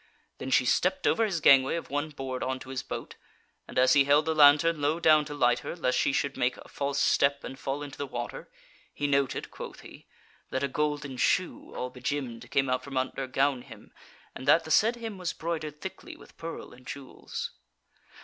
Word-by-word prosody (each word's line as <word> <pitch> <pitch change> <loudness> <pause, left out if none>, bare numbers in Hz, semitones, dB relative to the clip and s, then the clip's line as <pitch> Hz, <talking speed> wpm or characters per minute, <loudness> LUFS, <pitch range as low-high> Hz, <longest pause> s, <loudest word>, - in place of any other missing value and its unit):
Then - - -5
she - - +4
stepped 280 - +1
over 225 - +3
his 180 -7 -2
gangway 135 -1 +6
of 170 - -6
one 145 +2 -1
board 135 -3 -5
on 130 0 -1
to 130 - -10
his 130 -1 -3
boat, - - -7 0.5
and - - -8
as 130 0 +5
he 140 - +6
held 145 +2 +4
the 160 - +1
lantern 150 +2 +6
low 150 +3 +1
down 155 -2 +5
to 145 0 -6
light 120 -3 +3
her, - - -6
lest 125 -7 0
she - - +2
should 140 0 -1
make 125 +1 0
a - - -13
false 140 0 -2
step 140 0 +3
and 135 - -8
fall 140 +1 -3
into 140 -2 -9
the 145 - -3
water, 120 -2 -6 0.4
he 145 - -3
noted 140 -2 0
(quoth - - -9
he) - - -14 0.4
that 130 - -2
a - - +2
golden 145 -1 -2
shoe 180 +7 0
all 125 0 -4
begemmed 125 -2 -4
came 135 -1 +2
out 130 0 0
from 135 0 -6
under 130 +1 -2
gown 135 0 +1
hem - - -14 0.4
and 130 - -9
that 165 - +6
the 160 - -7
said 225 +8 +4
hem 225 -4 -7
was 180 -2 -2
broidered 155 -3 -4
thickly 190 - -8
with - - -17
pearl 165 0 -7
and 125 +1 -16
jewels. 140 -2 -6
140 Hz, 210 wpm, -28 LUFS, 130-155 Hz, 0.5 s, gangway